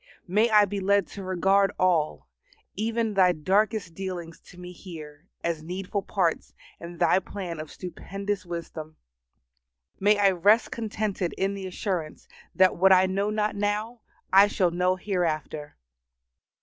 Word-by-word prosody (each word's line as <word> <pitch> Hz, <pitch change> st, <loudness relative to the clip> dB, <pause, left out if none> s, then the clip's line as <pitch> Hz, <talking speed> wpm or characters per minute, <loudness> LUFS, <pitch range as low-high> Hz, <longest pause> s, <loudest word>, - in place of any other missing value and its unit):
May 210 Hz, +6 st, +3 dB
I 210 Hz, -1 st, +6 dB
be 200 Hz, 0 st, -4 dB
led 200 Hz, 0 st, +2 dB
to 200 Hz, -, -8 dB
regard 195 Hz, +2 st, +2 dB
all, 170 Hz, -, +1 dB, 0.5 s
even 225 Hz, +1 st, -1 dB
Thy 185 Hz, -2 st, +4 dB
darkest 195 Hz, +3 st, 0 dB
dealings 175 Hz, -2 st, -6 dB
to 180 Hz, -, -16 dB
me 180 Hz, 0 st, -9 dB
here, 160 Hz, -3 st, -11 dB, 0.2 s
as 170 Hz, -2 st, -1 dB
needful 185 Hz, +4 st, -4 dB
parts 180 Hz, -4 st, -1 dB, 0.2 s
in 170 Hz, 0 st, -9 dB
Thy 185 Hz, -, +3 dB
plan 180 Hz, -4 st, -6 dB
of 155 Hz, -1 st, -7 dB
stupendous 195 Hz, +2 st, -5 dB
wisdom. 165 Hz, -3 st, -7 dB, 1.0 s
May 205 Hz, +2 st, +4 dB
I 200 Hz, -1 st, +4 dB
rest 205 Hz, +6 st, +3 dB
contented 210 Hz, -5 st, -3 dB
in 195 Hz, +1 st, 0 dB
the 195 Hz, -1 st, -6 dB
assurance 180 Hz, -4 st, -4 dB, 0.3 s
that 185 Hz, 0 st, +4 dB
what 190 Hz, +2 st, +5 dB
I 185 Hz, 0 st, +6 dB
know 195 Hz, +2 st, -1 dB
not 210 Hz, 0 st, -1 dB
now 210 Hz, +3 st, -2 dB, 0.3 s
I 195 Hz, +2 st, +8 dB
shall 185 Hz, -4 st, +1 dB
know 180 Hz, +2 st, +1 dB
hereafter. 160 Hz, -, -3 dB
190 Hz, 145 wpm, -26 LUFS, 175-205 Hz, 1.0 s, I